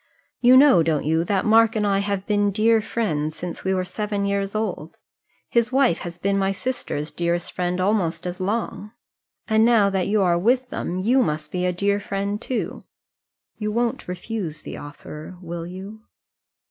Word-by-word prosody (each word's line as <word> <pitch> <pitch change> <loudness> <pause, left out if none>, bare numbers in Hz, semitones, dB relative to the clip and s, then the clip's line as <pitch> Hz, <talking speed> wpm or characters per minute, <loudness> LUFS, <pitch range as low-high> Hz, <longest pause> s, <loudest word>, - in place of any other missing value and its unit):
You 250 +1 +7
know, 270 - +7
don't 160 -3 0
you, 160 +2 +2
that 195 0 0
Mark 225 +1 +5
and 210 -1 +1
I 200 -1 +2
have 200 -1 -2
been 205 -1 +2
dear 220 +3 +3
friends 155 -10 -2
since 180 -1 -6
we 190 - 0
were 185 -1 0
seven 205 +1 -2
years 200 0 -1
old. 195 -7 -3 0.5
His 235 0 +1
wife 260 -9 +3
has 170 -1 -7
been 200 0 0
my 195 0 +1
sister's 195 - -3
dearest 170 0 -1
friend 180 0 -2
almost 185 -4 0
as 180 0 -4
long; 210 +2 -3 0.5
and 220 0 +4
now 225 -4 +4
that 190 -2 0
you 205 0 +2
are 170 -2 +3
with 250 +6 +2
them, 180 - -3
you 240 +8 +3
must 150 -5 -2
be 180 0 0
a - - +2
dear 200 +3 0
friend 200 +1 -3
too. 255 - -3 0.8
You 210 -1 -2
won't 235 +1 -1
refuse 180 -3 -5
the - - -7
offer; 150 +4 -9
will 170 -1 -6
you?" 195 +4 -9
200 Hz, 180 wpm, -23 LUFS, 175-220 Hz, 0.8 s, You